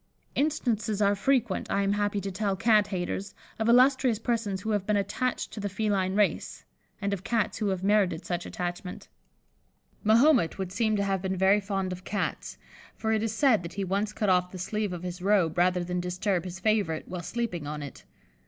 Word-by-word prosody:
Instances 235 Hz, -8 st, 0 dB
are 200 Hz, -1 st, +4 dB
frequent, 235 Hz, -1 st, 0 dB
I 200 Hz, -, +1 dB
am 200 Hz, 0 st, +1 dB
happy 205 Hz, 0 st, 0 dB
to 195 Hz, +1 st, -4 dB
tell 200 Hz, +1 st, -1 dB
Cat 210 Hz, 0 st, +4 dB
haters, 195 Hz, +1 st, -4 dB, 0.2 s
of 220 Hz, +1 st, +1 dB
illustrious 255 Hz, -1 st, +5 dB
persons 225 Hz, -4 st, -2 dB
who 220 Hz, -, -2 dB
have 205 Hz, -2 st, -1 dB
been 210 Hz, -1 st, +2 dB
attached 205 Hz, +6 st, -2 dB
to -, -, -7 dB
the 205 Hz, 0 st, -2 dB
feline 195 Hz, -2 st, 0 dB
race, 210 Hz, 0 st, 0 dB, 0.3 s
and 200 Hz, -1 st, -1 dB
of 190 Hz, -2 st, -4 dB
Cats 230 Hz, -3 st, 0 dB
who 215 Hz, -, 0 dB
have 190 Hz, -2 st, -1 dB
merited 195 Hz, -4 st, +2 dB
such 175 Hz, -1 st, -3 dB
attachment. 180 Hz, +1 st, -5 dB, 0.9 s
Mahomet 235 Hz, -, +4 dB
would 190 Hz, -2 st, -4 dB
seem 220 Hz, +1 st, +1 dB
to 200 Hz, -, +1 dB
have 195 Hz, -2 st, 0 dB
been 190 Hz, 0 st, -2 dB
very 190 Hz, +2 st, +4 dB
fond 195 Hz, -2 st, -2 dB
of 180 Hz, 0 st, -6 dB
Cats, 205 Hz, -, -3 dB, 0.4 s
for 220 Hz, -, -2 dB
it 220 Hz, -, +1 dB
is 225 Hz, -1 st, -1 dB
said 255 Hz, -6 st, +4 dB
that 170 Hz, 0 st, -8 dB
he 200 Hz, -, -3 dB
once 200 Hz, +3 st, -1 dB
cut 210 Hz, 0 st, -2 dB
off 180 Hz, -1 st, +3 dB
the 185 Hz, -, -9 dB
sleeve 210 Hz, +2 st, -2 dB
of 175 Hz, -1 st, -6 dB
his 180 Hz, 0 st, -5 dB
robe 185 Hz, -5 st, +2 dB
rather 180 Hz, 0 st, +2 dB
than 180 Hz, +1 st, -2 dB
disturb 180 Hz, +1 st, -1 dB
his 180 Hz, 0 st, -6 dB
favourite 200 Hz, -6 st, 0 dB
while 180 Hz, -1 st, -5 dB
sleeping 180 Hz, -6 st, -3 dB
on 150 Hz, 0 st, -5 dB
it. 140 Hz, -, -9 dB
200 Hz, 200 wpm, -28 LUFS, 185-215 Hz, 0.9 s, illustrious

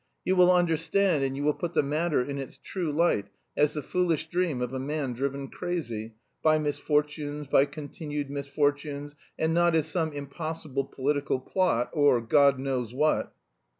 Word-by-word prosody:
You 185 Hz, -, +2 dB
will 180 Hz, 0 st, +6 dB
understand 170 Hz, -1 st, +2 dB
and 135 Hz, 0 st, -1 dB
you 145 Hz, -, -2 dB
will 150 Hz, 0 st, +3 dB
put 175 Hz, +1 st, -5 dB
the -, -, +4 dB
matter 150 Hz, +1 st, +1 dB
in 140 Hz, +1 st, -4 dB
its 135 Hz, -, -7 dB
true 175 Hz, -5 st, -3 dB
light, 150 Hz, -9 st, +2 dB, 0.3 s
as 150 Hz, +1 st, +2 dB
the 150 Hz, -, -3 dB
foolish 165 Hz, -3 st, 0 dB
dream 175 Hz, -7 st, 0 dB
of 125 Hz, +1 st, -3 dB
a 130 Hz, -, -2 dB
man 140 Hz, -1 st, -2 dB
driven 140 Hz, +2 st, -3 dB
crazy... 120 Hz, -12 st, -4 dB, 0.3 s
by 155 Hz, 0 st, +4 dB
misfortunes, 150 Hz, 0 st, -1 dB
by 135 Hz, 0 st, +4 dB
continued 145 Hz, 0 st, -5 dB
misfortunes, 145 Hz, +1 st, -1 dB, 0.2 s
and 160 Hz, 0 st, +1 dB
not 170 Hz, 0 st, +3 dB
as 160 Hz, -2 st, +2 dB
some 160 Hz, 0 st, -1 dB
impossible 145 Hz, -1 st, -4 dB
political 140 Hz, 0 st, -1 dB
plot 130 Hz, -5 st, 0 dB
or 145 Hz, -5 st, +4 dB
God 140 Hz, +4 st, +4 dB
knows 130 Hz, -3 st, -2 dB
what!" 150 Hz, +3 st, +1 dB
145 Hz, 165 wpm, -28 LUFS, 140-160 Hz, 0.3 s, will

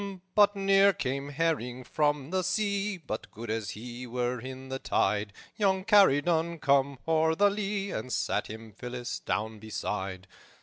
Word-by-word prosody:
"But 205 Hz, -1 st, +5 dB
ne'er 195 Hz, 0 st, +5 dB
came 140 Hz, 0 st, -3 dB
herring 140 Hz, -5 st, -1 dB
from 145 Hz, +1 st, 0 dB
the 185 Hz, 0 st, +1 dB
sea, 200 Hz, 0 st, 0 dB
But 135 Hz, -10 st, -6 dB
good 115 Hz, +1 st, -6 dB
as 110 Hz, -2 st, -2 dB
he 120 Hz, +4 st, -7 dB
were 125 Hz, +1 st, -1 dB
in 130 Hz, +1 st, -8 dB
the 135 Hz, 0 st, -3 dB
tide; 105 Hz, -2 st, 0 dB, 0.3 s
Young 190 Hz, -3 st, +2 dB
Corydon 170 Hz, -5 st, +4 dB
came 140 Hz, -1 st, +2 dB
o'er 160 Hz, 0 st, +3 dB
the 205 Hz, +3 st, +4 dB
lea, 200 Hz, -1 st, -2 dB
And 110 Hz, +4 st, -4 dB
sat -, -, 0 dB
him 110 Hz, 0 st, -9 dB
Phillis 120 Hz, +3 st, -5 dB
down 105 Hz, +3 st, -2 dB
beside. 100 Hz, -3 st, -4 dB
140 Hz, 150 wpm, -29 LUFS, 120-190 Hz, 0.3 s, But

